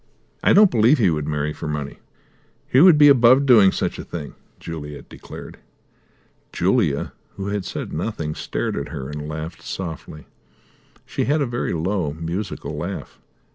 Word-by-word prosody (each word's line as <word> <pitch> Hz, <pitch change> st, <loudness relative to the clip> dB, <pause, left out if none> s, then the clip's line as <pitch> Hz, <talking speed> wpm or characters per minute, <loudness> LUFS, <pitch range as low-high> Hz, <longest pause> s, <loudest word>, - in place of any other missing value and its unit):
"I -, -, +5 dB
don't 205 Hz, -2 st, +6 dB
believe 120 Hz, +6 st, +4 dB
he 100 Hz, -8 st, +3 dB
would 75 Hz, -2 st, -2 dB
marry 75 Hz, 0 st, -2 dB
for 80 Hz, -, -7 dB
money. 75 Hz, -2 st, -4 dB, 0.7 s
He 130 Hz, -, +4 dB
would 175 Hz, -3 st, +8 dB
be 145 Hz, 0 st, +7 dB
above 130 Hz, 0 st, +6 dB
doing 110 Hz, -7 st, +6 dB
such -, -, -3 dB
a -, -, -5 dB
thing!" 80 Hz, -4 st, -7 dB, 0.3 s
Juliet 75 Hz, -3 st, -8 dB
declared. -, -, -11 dB, 0.9 s
Julia, 90 Hz, -, 0 dB, 0.2 s
who 100 Hz, 0 st, -4 dB
had 100 Hz, -2 st, -3 dB
said -, -, -5 dB
nothing, 80 Hz, -3 st, -3 dB
stared -, -, -3 dB
at 70 Hz, -, -4 dB
her, 70 Hz, -4 st, -6 dB
and 75 Hz, 0 st, -6 dB
laughed 80 Hz, +2 st, -6 dB
softly. 80 Hz, -4 st, -7 dB, 0.8 s
She -, -, -2 dB
had 150 Hz, +3 st, +1 dB
a 145 Hz, -, +1 dB
very 120 Hz, -1 st, -3 dB
low, 85 Hz, -2 st, -1 dB
musical 85 Hz, +1 st, -5 dB
laugh. 85 Hz, +6 st, -6 dB
85 Hz, 160 wpm, -22 LUFS, 75-115 Hz, 0.9 s, would